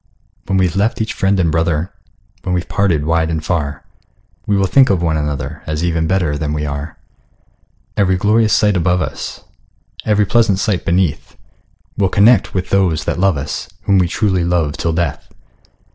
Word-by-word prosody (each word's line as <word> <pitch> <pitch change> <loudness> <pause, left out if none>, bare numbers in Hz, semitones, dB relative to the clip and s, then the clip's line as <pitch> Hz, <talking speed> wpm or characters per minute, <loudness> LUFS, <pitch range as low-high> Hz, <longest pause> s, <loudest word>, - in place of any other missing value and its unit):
When 95 0 +1
we've 90 -1 +1
left 105 +4 0
each 110 -1 -2
friend 95 0 +1
and 85 -3 +2
brother, 80 +2 -1 0.5
When 90 -1 -2
we're 90 - -2
parted 90 -8 0
wide 80 0 +1
and 80 -1 -3
far, 75 -6 -2 0.6
We 100 - +2
will 95 - +2
think 130 +8 +4
of 90 -3 +1
one 80 -2 +1
another, 75 0 -3
As 75 +1 -2
even 80 -2 0
better 85 -5 0
than 75 -1 -2
we 75 0 -2
are. 75 +2 -5 1.0
Every 95 -2 +2
glorious 105 +3 +2
sight 105 -2 +3
above 90 +1 +1
us, - - -6 0.6
Every 105 -1 +2
pleasant 110 -2 +2
sight 100 -2 -1
beneath, 85 -3 -1 0.6
We'll 95 -2 +2
connect 110 +4 +3
with 90 0 -2
those 90 -6 +2
that - - -2
love 95 -4 +2
us, 75 +1 -5
Whom 100 -1 +3
we 90 - +2
truly 95 -1 0
love 85 -4 0
till 85 - -1
death! 85 +1 -3
90 Hz, 175 wpm, -17 LUFS, 80-100 Hz, 1.0 s, think